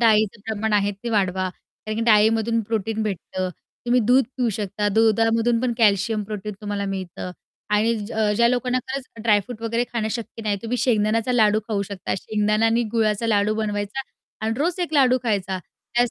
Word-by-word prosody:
डाळीचं 215 -2 +3
प्रमाण 220 0 -1
आहे 205 0 +2
ते 230 +4 -6
वाढवा 190 -3 +1
कारण 215 +3 -9
की 230 - -1
डाळीमधून 225 +1 +4
प्रोटीन 220 0 -2
भेटतं. 185 -2 -3 0.4
तुम्ही 245 +1 +4
दूध 255 +1 +5
पिऊ 250 -2 +1
शकता. 205 0 -1
दुधामधून 225 +1 +3
पण 255 -1 0
कॅल्शियम, 210 0 +3
प्रोटीन 210 0 -5
तुम्हाला 205 -1 -3
मिळतं 185 -2 -5 0.4
आणि 225 +2 +3
ज - - -8 0.2
ज्या 235 +1 +5
लोकांना 250 +1 +1
खरंच 270 0 -3 0.2
ड्राय 210 -3 +4
फ्रूट 225 +2 -9
वगैरे 230 +1 0
खाणं 220 -2 -1
शक्य 230 0 -5
नाही, 210 -2 0
तुम्ही 230 +2 -2
शेंगदाण्याचा 225 0 +1
लाडू 215 -3 +4
खाऊ 205 -3 0
शकता. 195 -3 -3
शेंगदाण्याने 215 +3 +1
गुळाचा 220 -1 +1
लाडू 210 -1 +2
बनवायचा 210 +2 -2 0.4
आणि 220 +1 0
रोज 340 +5 0
एक 345 - -2
लाडू 255 -2 +5
खायचा 195 -5 -1
त्याच 240 +6 -2
220 Hz, 170 wpm, -23 LUFS, 205-235 Hz, 0.4 s, दूध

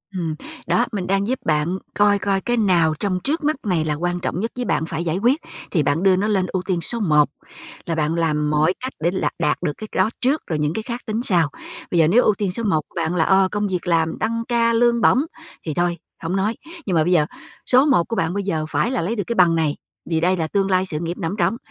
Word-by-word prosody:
Ừm. 165 -4 -2 0.3
Đó, 240 - +3
mình 195 -4 -3
đang 195 +1 +1
giúp 260 +2 -1
bạn 155 +4 +1 0.2
coi 205 0 +3
coi 195 -1 0
cái 240 +3 -1
nào 175 -7 +3
trong 185 -3 -1
trước 310 +3 0
mắt 305 +1 +2
này 175 -6 +1
là 150 - 0
quan 175 +3 -2
trọng 175 - -3
nhất 225 +4 -2
với 250 - -3
bạn 160 - 0
phải 165 0 -3
giải 160 +2 0
quyết 250 - +2 0.3
thì 160 -5 +2
bạn 145 +5 0
đưa 190 -1 +5
nó 200 +3 0
lên 195 -4 +1
ưu 185 +1 -2
tiên 180 -3 -1
số 235 +7 0
1. 150 -7 +3 0.6
Là 165 - -2
bạn 155 +1 0
làm 150 -3 0
mọi 155 +3 +2
cách 260 +1 -5
để 170 +2 +1
lạt 190 - 0
đạt - - +1
được 160 - +1
cái 215 - -7
đó - - +3
trước, 275 +4 +2
rồi 160 -3 -2
những 150 +1 0
cái 220 - -3
khác 240 +1 -5
tính 220 0 -2
sau. 170 - +2 0.4
Bây 175 - +1
giờ 160 - +5
nếu 225 +9 +5
ưu 215 - +4
tiên 200 -2 -1
số 230 +6 -4
1 175 -8 +2
bạn 165 +1 -1
là, 165 - +3
ờ, 190 0 +4
công 210 0 -1
việc 180 -2 -3
làm, 165 -1 +1
tăng 230 +1 -1
ca, 235 -1 +2
lương 235 0 +3
bổng 240 - +5 0.5
thì 155 - -2
thôi, 175 +2 0 0.3
hổng 165 +3 -1
nói, 205 +4 0 0.3
nhưng 185 - 0
mà 160 - +4
bây 175 - 0
giờ 155 -4 +4 0.4
số 260 +2 +5
1 260 - +4
của 230 - -3
bạn 165 -4 0
bây 200 0 -2
giờ 160 -5 -1
phải 235 - 0
là 260 - 0
lấy 195 +8 -1
được 205 - -1
cái 235 - -2
bằng 175 -4 +5
này, 155 -3 +1 0.3
vì 165 -1 +1
đây 185 +2 +2
là 160 - -1
tương 195 +2 0
lai 185 0 +3
sự 155 -5 -4
nghiệp 170 +1 -4
nằm 165 +1 -2
ở - - -4
trỏng. 230 - +1
185 Hz, 270 wpm, -21 LUFS, 165-220 Hz, 0.6 s, đưa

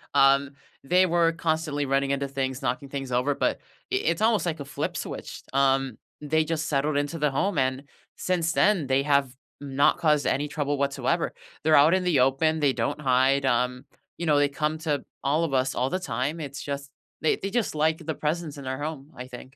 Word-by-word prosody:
um, 140 0 +4 0.3
they 180 +7 +4
were 170 -1 +2
constantly 160 -3 -1
running 135 0 +1
into 140 0 -1
things, 135 0 -3
knocking 135 +2 -2
things 135 -2 -5
over, 125 +4 +1
but - - 0 0.3
I - - +4
it's 170 - 0
almost, 220 -6 +3
like, 160 -2 -2
a 140 - -6
flip 140 - -4
switched, - - -7
um, 135 -3 +2 0.2
they 155 +2 +1
just 155 -1 -2
settled 145 0 0
into 145 +3 -2
the 150 -1 +2
home, 175 +5 0
and 130 +1 0 0.3
since 170 -3 0
then 190 -9 +3
they 135 +1 +2
have 140 -2 +1 0.3
not 140 0 +2
caused 150 -3 +2
any 145 +2 0
trouble 145 -1 -2
whatsoever, 140 0 0 0.3
they're 155 0 +5
out 150 +5 +6
in 185 - +2
the 175 -6 +2
open, 145 +5 +2
they 140 -3 +2
don't 135 +5 -2
hide, 135 +1 +3
um, 125 +1 0 0.3
you 170 - -4
know, 150 -2 +3
they 145 0 +3
come 150 +2 -1
to 150 -4 -1 0.2
all 150 +4 +2
of 155 - -2
us, 130 0 +1
all 125 +2 0
the 185 - -1
time, 145 0 -2
it's 140 -2 -6
just, 140 -1 -5 0.3
they 160 - +2
they 195 - -4
just 225 -3 -1
like 155 +1 +1
the 160 -2 -2
presence 155 -1 -3
in 140 - -8
our 130 +1 -3
home, 150 -1 -5
I 125 +1 -8
think. 125 -1 -9
145 Hz, 210 wpm, -26 LUFS, 135-160 Hz, 0.3 s, out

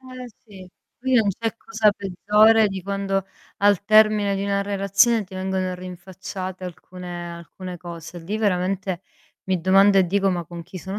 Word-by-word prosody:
Eh, 255 -1 -9 0.2
sì 190 -4 -13 0.3
qui 260 -1 +1
non 220 -4 +4
c'è 225 -2 -2
cosa 215 -2 +2
peggiore 210 +3 +3
di 195 -1 -5
quando 195 0 -2 0.3
al 200 -1 +3
termine 215 -2 +4
di 195 - -2
una 200 0 0
relazione 200 +3 +2
ti 190 - -14
vengono 185 -1 -2
rinfacciate 185 +1 -8
alcune 175 -1 -8
alcune 175 +2 -9
cose. 170 0 -9
Lì 200 +6 -4
veramente 190 -2 -1 0.4
mi 185 -2 -1
domando 195 +2 +5
e 185 - +4
dico: 195 +2 +1
"Ma 175 -2 -2
con 170 +1 -9
chi 185 +3 -10
sono 190 +3 -6
195 Hz, 165 wpm, -23 LUFS, 180-205 Hz, 0.4 s, domando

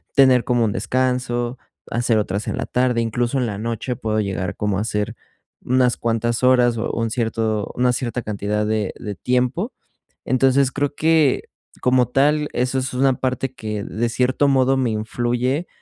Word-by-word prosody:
tener 130 -3 +5
como 120 -2 +2
un 110 - +1
descanso, 125 +3 -1 0.3
hacer 120 -1 +1
otras 105 0 -2
en - - -1
la 130 - -2
tarde, 125 -1 +1
incluso 120 +3 -1
en 125 - +1
la 105 -3 -3
noche 115 +3 -3
puedo 110 -1 -1
llegar 95 -3 -3
como 105 -2 -1
a 100 - -1
hacer 105 +1 -2 0.5
unas 125 -1 +2
cuantas 115 +1 -1
horas 125 -2 +4
o 110 - -2
un 115 -1 -1
cierto 110 -2 -1
una 125 0 +3
cierta 125 0 -2
cantidad 105 0 -2
de 110 -2 -1
de 105 -2 -6
tiempo. 125 - 0 0.5
Entonces, 130 +1 +3
creo 145 +1 -2
que, 155 -3 +2 0.3
como 125 -1 +3
tal, 150 +3 +2
eso 130 +1 0
es 130 0 -3
una 135 +1 +3
parte 130 0 -2
que 105 -4 -4
de 115 +3 -2
cierto 130 +4 +1
modo 135 -1 +3
me 130 -2 +1
influye 120 +7 -1
120 Hz, 170 wpm, -21 LUFS, 110-130 Hz, 0.5 s, tener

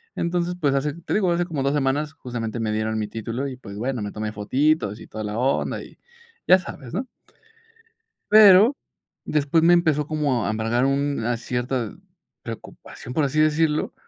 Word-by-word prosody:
Entonces, 175 +1 -1
pues, 140 -4 +2
hace 140 +1 0
te 170 +1 -6
digo, 190 -4 +2
hace 175 0 +1
como 155 -6 -3
2 140 +1 +1
semanas 145 +2 0
justamente 120 -6 -5
me 110 -1 -1
dieron 110 0 -1
mi 105 - -2
título 115 +5 -4
y, 135 - -6
pues 100 -6 -10
bueno, 125 +1 -2
me 105 - -4
tomé 105 0 -4
fotitos 110 +1 0
y - - -12
toda 110 0 -6
la 105 +1 -4
onda, 130 +3 0
y - - -15 0.5
ya 185 - +8
sabes, 135 -6 -9
¿no? 250 +7 -3 1.2
Pero 215 +4 +8 0.5
después 150 +2 +1
me 175 +1 +6
empezó 155 -4 +2
como 145 -7 0
a - - 0
embargar 115 +3 0
una 135 -4 0
cierta 125 -2 -3 0.5
preocupación, 125 - -9
por 155 - +1
así 145 +3 -1
decirlo, 155 0 +2
135 Hz, 175 wpm, -23 LUFS, 115-155 Hz, 1.2 s, ya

